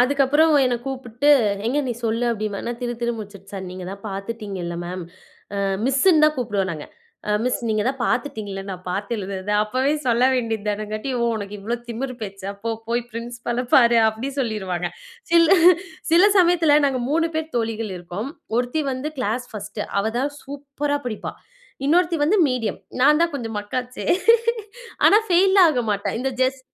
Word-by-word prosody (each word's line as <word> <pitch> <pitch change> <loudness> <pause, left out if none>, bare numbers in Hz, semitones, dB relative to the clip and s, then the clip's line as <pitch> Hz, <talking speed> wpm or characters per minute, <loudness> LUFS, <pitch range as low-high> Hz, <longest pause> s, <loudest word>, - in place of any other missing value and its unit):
அதுக்கப்புறம் 285 +4 +4
என்னை 250 -1 +1
கூப்பிட்டு, 265 +1 0 0.4
"எங்க 260 +5 +1
நீ 245 - 0
சொல்லு." 230 +2 0
அப்படிம்ப. 215 -2 -3
நான் 240 0 -4
திரு 240 -1 -2
திருன்னு 235 -1 -1
முழிச்சுட்டு, 200 -2 -10
சார்! 195 -1 -5
நீங்கதான் 185 +2 -8
பாத்துட்டீங்கள 195 -3 -5
மேம். 180 0 -5 0.5
அ - - -2 0.3
மிஸ்ன்னு 300 +5 +4
தான் 305 - +3
கூப்பிடுவோம் 205 -6 -1
நாங்க. 155 -2 -7 0.4
அ - - +2
மிஸ் 250 - 0
நீங்க 215 -1 +1
தான் 270 0 -3
பாத்துட்டீங்கள 215 -7 -2
நான் 185 -1 -7
பாத்து 200 +4 -3
எழுதுறத, 195 -1 -5
அப்பவே 260 +6 0
சொல்ல 240 +1 +3
வேண்டியதுதானேங்காட்டி. 215 0 -2
"ஓ! - - +1
உனக்கு 205 -1 -6
இவ்ளோ 225 +4 -2
திமிரு 255 +3 -4
பேச்சா? 195 -1 -6
போ 230 - 0 0.2
போய் 240 +1 0
பிரின்சிபால 235 +1 -4
பாரு!" 235 -2 +6
அப்படி 220 +5 -4
சொல்லிருவாங்க. 190 -7 -2 0.4
சில 335 -1 +6 0.6
சில 345 - +7 0.2
சமயத்துல 340 -4 +5
நாங்க 260 -2 0
3 330 +2 +2
பேர் 320 0 -3
தோழிகள் 225 -3 -2
இருப்போம். 180 +9 -6 0.3
ஒருத்தி 250 +6 0
வந்து 260 +4 -4
கிளாஸ் 245 +2 -1
1 210 0 -5 0.2
அவதான் 240 +7 -1
சூப்பரா 285 +1 -3
படிப்பா. 215 -3 -4 0.5
இன்னொருத்தி 345 +2 +3
வந்து 390 +8 +3
மீடியம். 230 -5 -2 0.2
நான் 300 +3 +5
தான் 340 -1 +1
கொஞ்சம் 225 -5 -4
மக்கு 205 +3 -5
ஆச்சே! 250 0 -8 1.0
ஆனா 410 - +7
ஃபெயில்லாம் 380 0 +6
ஆக 250 -3 0
மாட்டேன். 205 +2 -2
இந்த 265 +1 -1
ஜஸ் 260 +1 0
235 Hz, 160 wpm, -22 LUFS, 205-275 Hz, 1.0 s, சில